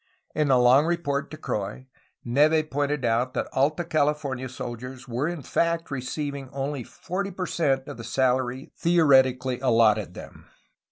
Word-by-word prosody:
In 150 -2 +1
a 130 - +5
long 125 +5 +5
report 165 -5 -1
to 155 - -8
Croix, 105 +3 -4 0.4
Neve 155 +5 +3
pointed 145 -1 -1
out 120 +3 +1
that - - -1
Alta 150 +6 +1
California 145 -5 -1
soldiers 125 +1 -7
were 125 +5 -1
in 170 -4 -4
fact 170 +3 0
receiving 140 +1 -4
only 135 0 -3
forty 190 - -4
per 185 -1 -4
cent 135 -7 0
of - - -7
the 115 - -8
salary 130 +1 0
theoretically 130 -7 +3
allotted 115 -5 +3
them. - - -11
135 Hz, 150 wpm, -25 LUFS, 125-155 Hz, 0.4 s, a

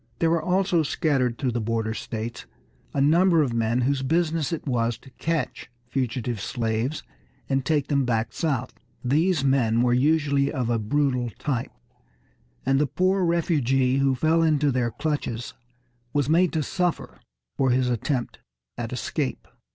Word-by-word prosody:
There 165 -1 +2
were 165 -1 +2
also 185 0 +2
scattered 135 -6 0
through 130 -3 -1
the 120 0 -2
border 110 0 -1
states 115 +1 -5 0.4
a - - -2
number 165 +3 +4
of 125 -5 -2
men 115 +1 +1
whose 135 +2 +1
business 160 +1 0
it 165 - -4
was 120 -4 0
to 130 +3 -17
catch 160 -4 -3 0.2
fugitive 120 -4 -2
slaves 115 +5 -2 0.4
and 135 -1 0
take 150 -1 +1
them 140 -2 +2
back 115 -2 -1
south. 140 -7 -1 0.3
These 155 +4 +2
men 120 -4 +2
were 120 -1 +3
usually 140 +1 +2
of 125 -5 -1
a 115 - +1
brutal 125 +2 0
type, 130 -5 -2 0.9
and 135 +1 +3
the 150 - +2
poor 185 +5 +1
refugee 135 -7 +2
who 135 -1 +2
fell 160 +5 +2
into 150 -3 +3
their 125 -2 0
clutches 125 -2 -3 0.6
was 145 -2 +1
made 170 +3 +3
to 155 - 0
suffer 180 +2 -2 0.4
for 130 - +2
his 125 0 +2
attempt 125 +1 -2 0.4
at 115 -1 -4
escape. 130 +2 -3
135 Hz, 155 wpm, -25 LUFS, 120-155 Hz, 0.9 s, number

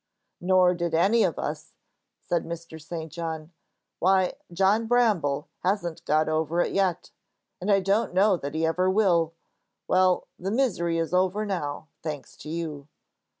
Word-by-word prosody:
"Nor 180 0 +4
did 170 -2 -2
any 200 +8 +4
of - - 0
us," - - -5 0.5
said 170 -2 0
Mr. 165 -1 -8
St. 160 0 -6
John. 160 -1 -5 0.5
"Why, 190 0 +3 0.2
John 195 +5 +2
Bramble 200 -13 +2
hasn't 175 -3 -1
got 155 +1 +2
over 155 +2 0
it - - 0
yet. 190 -4 0 0.5
And 195 +3 0
I 195 -1 +4
don't 200 +4 +1
know 190 +2 +4
that 145 -3 -6
he 160 +1 +1
ever 180 +3 +1
will. 175 -5 +2 0.5
Well, 185 -1 +3
the 185 - -3
misery 195 -8 +1
is 165 +1 -2
over 190 +3 +2
now, 155 -6 -3
thanks 150 -3 -6
to - - -9
you." 155 -4 -5
175 Hz, 150 wpm, -26 LUFS, 160-190 Hz, 0.5 s, Nor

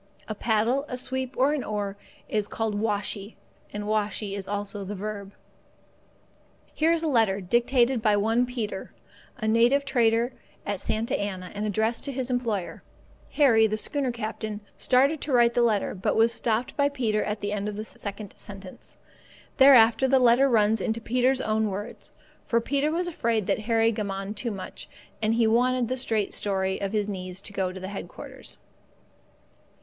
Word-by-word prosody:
A 215 - -3
paddle, 225 +5 +1
a 250 - -3
sweep, 260 0 -3
or 270 +3 +3
an 290 -4 -2
oar, 205 -2 -3 0.3
is 210 -1 -1
called 225 0 -2
washee, 205 0 -2 0.4
and 205 0 -4
washee 210 -1 -1
is 195 -1 -5
also 205 0 -3
the 200 +2 -5
verb. 200 0 -5 1.4
Here 320 +2 +2
is 335 -1 +1
a - - +1
letter, 225 -8 +2
dictated 240 +5 +2
by 210 -2 +3
one 225 +4 +2
Peter, 220 -6 -5 0.4
a 220 -3 -3
native 240 +6 +4
trader 240 -2 +2 0.3
at 205 -2 -3
Santa 220 +2 -1
Anna, 190 -3 -4
and 210 +1 -3
addressed 220 +3 0
to 280 - -3
his 260 -1 -3
employer. 230 -7 -2 0.5
Harry, 230 -7 +5
the 215 0 -2
schooner 275 +2 -1
captain, 220 -2 -5
started 275 +4 +2
to 290 - -3
write 240 -2 +4
the 240 - +2
letter, 220 -4 +1
but 185 - -1
was 225 +1 +4
stopped 230 +1 -1
by 285 0 +3
Peter 230 -7 0
at 210 0 -3
the 205 - -2
end 205 0 -2
of 210 - -6
the 215 - -4
second 200 -1 -7
sentence. 195 -2 -10 0.6
Thereafter 265 -2 +7
the 265 +1 +4
letter 250 +2 +5
runs 220 -2 +3
in 220 - 0
Peter's 250 +3 +1
own 215 0 +1
words, 200 +2 -7 0.4
for 235 - +3
Peter 280 +5 0
was 350 +2 -1
afraid 230 - 0
that - - 0
Harry 225 0 +4
gammoned 200 -1 -4
too 235 +3 -2
much, 195 -4 -7 0.3
and 220 +1 +2
he 230 -1 +3
wanted 245 +2 +2
the 255 - 0
straight 220 -5 0
story 190 -1 -1
of 195 -1 -2
his 210 -1 0
needs 185 -2 -5
to 200 - -7
go 190 -2 -1
to 190 0 -7
headquarters. 195 0 -4
220 Hz, 175 wpm, -26 LUFS, 205-245 Hz, 1.4 s, Thereafter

